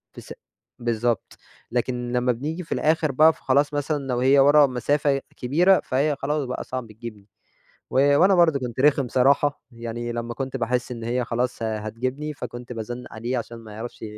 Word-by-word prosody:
في - - -9
ث - - -10 0.5
بالضبط، 120 -1 -1 0.3
لكن 120 0 -2
لمّا 125 0 +2
بنيجي 150 +9 -4
في 165 - -20
الآخر 155 -1 +1
بقى 155 +4 +5
ف - - -21
خلاص 145 +3 +2
مثلًا 145 +1 -1
لو 125 -2 -1
هي 135 +2 +5
ورا 145 +1 +6
مسافة 135 +3 0 0.2
كبيرة 175 +10 +3
فهي 145 +3 +1
خلاص 145 +1 -1
بقى 125 - -4
صعب 130 -2 -5
تجيبني، 110 -2 -10 0.6
و 140 +2 +4
وأنا 190 +4 +5
برضو 170 -5 +4
كنت 125 -1 -5
رخم 140 -2 +3
صراحة، 140 +4 +2
يعني 120 0 -5
لمّا 120 0 -4
كنت 135 +1 -4
باحس 120 +1 -1
إن 115 -1 -7
هي 120 +2 -1
خلاص 120 0 -2
ه 110 -1 -1
هتجيبني 130 +8 -4
فكنت 125 -1 -7
بازنّق 120 +2 -6
عليه 120 +3 -2
عشان 115 0 -7
ما 110 -2 -12
يعرفش 110 +3 -8
125 Hz, 180 wpm, -24 LUFS, 120-145 Hz, 0.6 s, ورا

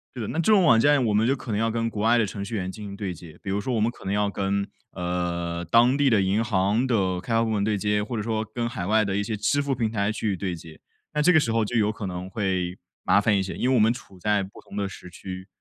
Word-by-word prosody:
对 125 - -5
的， 110 - -3
那 165 - -2
这 220 - +3
种 200 -3 +6
网 115 -8 +6
站 145 +1 +4
我 110 - +1
们 110 +2 +3
就 135 - +3
可 125 - -7
能 105 - 0
要 115 0 +1
跟 115 0 -1
国 105 - -5
外 115 +2 +4
的 110 - +3
程 100 0 -5
序 100 +3 -5
员 95 -2 -2
进 105 +2 -9
行 100 -1 -7
对 100 -3 -4
接。 85 -1 -13
比 - - -5
如 100 +1 0
说 130 - -2
我 - - +1
们 110 +2 +2
可 - - -15
能 95 - -1
要 105 0 +1
跟， 100 0 -1 0.2
呃， 85 -1 -2
当 120 +8 +4
地 145 -1 +3
的 110 -4 +4
银 95 +4 +1
行 105 +4 +1
的 95 -7 +1
开 115 - -4
发 115 0 +3
部 115 - -1
门 105 -2 0
对 105 0 +1
接， 105 +1 0
或 115 +2 -4
者 105 - -2
说 110 0 -1
跟 120 -1 -1
海 90 -7 -4
外 110 +1 +3
的 95 -1 -1
一 100 - +1
些 110 0 -3
支 145 +8 +1
付 140 -1 -1
平 115 -3 0
台 100 -1 0
去 110 -2 -1
对 90 -1 -3
接。 80 -1 -12 0.3
那 150 - +1
这 180 +4 +5
个 160 - +6
时 115 -7 0
候 115 0 +2
就 115 +3 -4
有 105 -2 +3
可 110 -1 -6
能 90 0 -5
会 95 -3 -1 0.3
麻 100 - +4
烦 105 -1 +3
一 95 - +1
些， 95 - -5
因 125 - 0
为 130 - +3
我 - - +4
们 110 +2 +4
处 110 -7 -12
在 105 +2 +1
不 95 +1 -9
同 - - -10
的 100 -1 -1
时 90 - -11
区。 95 +1 -8
105 Hz, 335 characters per minute, -25 LUFS, 95-115 Hz, 0.3 s, 种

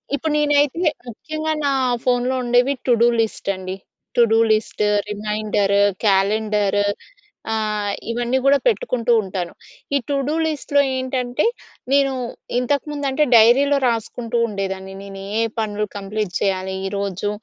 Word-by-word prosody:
ఇప్పుడు 310 +1 -2
నేను 295 -1 +2
ఐతే, 320 +4 0 0.2
ముక్యం‌గా 310 +7 -4
నా 280 - +2 0.3
ఫోన్‌లో 250 +1 +1
ఉండేవి 245 +3 +3
టు - - +4
డు 240 - +6
లిస్ట్ 220 -2 -3
అండి. 185 0 -6 0.4
To 240 - +5
do - - +5 0.2
list, 215 -1 -1 0.3
reminder, 210 -1 0 0.3
calendar 205 +1 +2 0.7
ఆహ్, 210 -2 -1 0.2
ఇవన్నీ 240 +2 0
గూడా 280 +1 +6
పెట్టుకుంటూ 250 - 0
ఉంటాను. 185 -3 -5 0.4
ఈ - - +5
టు 285 - +1
డు 300 - 0
లిస్ట్‌లో 285 -2 +1 0.2
ఏంటంటే, 255 - -1 0.5
నేను 275 -1 +4 0.5
ఇంతకుముందు 285 +2 -2
అంటే 300 +3 +2
డైరీలో 260 +6 +6
రాసుకుంటూ 235 0 -2
ఉండేదాన్ని. 190 -2 -4
నేను 195 -1 -9 0.2
ఏ - - +3 0.2
పనులు 210 -1 -1
కంప్లీట్ 200 -1 -4
చేయాలి 190 -1 -1
ఈరోజు 200 0 -3
225 Hz, 130 wpm, -21 LUFS, 205-275 Hz, 0.7 s, డు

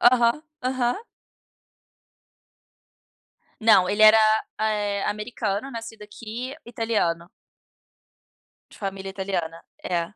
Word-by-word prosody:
Aham, 240 +3 +4 0.2
aham. 255 - 0 2.6
Não, 215 -5 +5
ele 205 +2 +2
era, 215 +1 +9 0.4
eh, 210 -2 0
americano 210 +2 -3
nascido 225 -3 -8
aqui 230 +5 -7
italiano. 215 -8 -1 1.4
De - - -16
família 195 -1 -5
italiana, 190 -4 -3 0.2
é. 170 +1 -2
215 Hz, 85 wpm, -24 LUFS, 195-235 Hz, 2.6 s, era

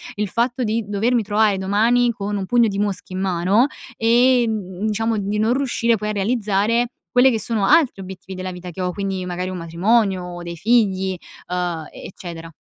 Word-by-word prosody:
il 210 0 -1
fatto 240 +5 -1
di 225 0 0
dovermi 225 +4 +1
trovare 210 0 +2
domani 225 +6 +2
con 205 -2 -4
un 195 - -3
pugno 235 +3 +3
di 200 -1 -3
mosche 200 -2 -2
in 185 - -3
mano 190 +6 +2 0.3
e, 240 +2 +4
mhmm, 210 -1 -3
diciamo, 225 +1 0
di 205 +1 -2
non 220 +3 +2
riuscire 235 -4 +1
poi 210 +1 -3
a - - 0
realizzare 215 +2 +1 0.2
quelle 250 +1 +5
che 230 -3 0
sono 215 -2 0
altri 255 -5 +3
obiettivi 190 0 -9
della 185 0 -4
vita 180 0 -8
che 175 - -11
ho, 180 0 -1
quindi, 195 -2 -3
magari 180 +1 -3
un 185 - -5
matrimonio 185 +3 +1
o 175 0 -7
dei 170 0 -6
figli, 190 -1 +2 0.3
uhm, 175 -3 -3
e - - -11
eccetera. 170 -3 -9
205 Hz, 195 wpm, -21 LUFS, 185-230 Hz, 0.3 s, quelle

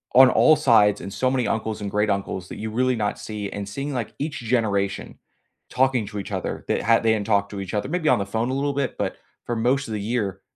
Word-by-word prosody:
on 130 0 +9
all 155 - +5
sides, 105 -7 +4
and 100 - -7
so 130 +3 +1
many 125 -3 0
uncles 110 -1 -2
and 100 - -4
great-uncles 100 -3 -1
that - - -7
you 110 0 -5
really 130 +3 +1
not 105 -2 -2
see, 105 -2 -5
and 100 -1 -5
seeing, 140 +8 -4
like, 120 -4 -3
each 150 +1 -3
generation 110 -5 -1 0.5
talking 130 -3 +2
to 105 0 -7
each 100 - -7
other 95 -2 -3
that - - +1
ha 115 0 +5
they 115 -1 +2
didn't 105 -2 -2
talk 100 -2 +2
to 100 - -6
each 95 +1 -6
other 105 +5 -1
maybe 170 -1 -1
on - - +4
the 100 - -1
phone 110 +5 -2
a - - -1
little 140 +1 0
bit, 140 -3 -2
but - - -2 0.3
for 120 - -2
most 125 +4 +1
of 110 - -4
the 105 - -2
year 100 -3 -2
110 Hz, 250 wpm, -23 LUFS, 100-130 Hz, 0.5 s, on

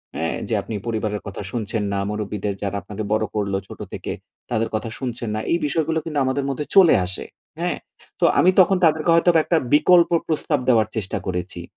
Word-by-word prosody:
হ্যাঁ? 80 0 -1
যে - - -2
আপনি 110 - -6
পরিবারের 110 -2 -2
কথা 100 +1 -6
শুনছেন 110 -2 -2
না। 100 - 0
মুরব্বীদের, 105 -1 -3
যারা 100 0 -2
আপনাকে 105 +3 -6
বড় 110 0 +2
করলো 100 -2 0
ছোট - - -11
থেকে, - - -5 0.4
তাদের 115 -1 0
কথা 110 +1 -3
শুনছেন 120 -3 -4
না। - - -1
এই 170 - +4
বিষয়গুলো 160 +2 0
কিন্তু 150 -3 -2
আমাদের 130 +1 0
মধ্যে 140 +2 -3
চলে 190 -4 +8
আসে। 90 0 -4 0.3
হ্যাঁ? - - -1 0.4
তো - - +3
আমি 185 - +6
তখন 190 +1 +5
তাদেরকে 155 +1 +2
হয়তোবা 170 0 +4
একটা 170 - +2 0.2
বিকল্প 170 +3 +6 0.2
প্রস্তাব 155 -2 0
দেওয়ার 110 -4 +4
চেষ্টা 105 -4 -2
করেছি। 90 -1 -3
115 Hz, 190 wpm, -22 LUFS, 105-155 Hz, 0.4 s, চলে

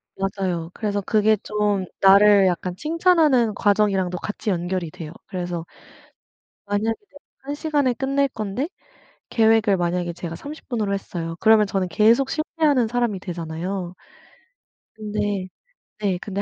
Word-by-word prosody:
맞아요. 190 -4 -2
그래서 205 -2 -2
그게 215 +2 +3
좀 205 -2 -1 0.2
나를 200 0 +7
약간 180 0 -2
칭찬하는 310 - +3
과정이랑도 200 -3 +1
같이 210 +4 -4
연결이 175 -1 -2
돼요. 160 -2 -9 0.2
그래서 175 -2 -4 1.0
만약에 205 +2 0
이제 410 -8 -31 0.2
1 280 +2 -5
시간에 290 -4 +1
끝낼 275 +3 0
건데 220 +4 -3 0.6
계획을 220 -3 +3
만약에 175 0 -1
제가 170 -1 -6
30 295 - -10
분으로 215 -5 -1
했어요. 170 -4 -4
그러면 220 -1 +5
저는 195 -2 -1
계속 225 +9 +3
실패하는 305 -5 +1
사람이 235 -4 -1
되잖아요. 175 +1 -5 1.0
근데 205 -3 -2 0.5
네 195 -3 0
근데 200 -1 -3
205 Hz, 295 characters per minute, -22 LUFS, 185-230 Hz, 1.0 s, 나를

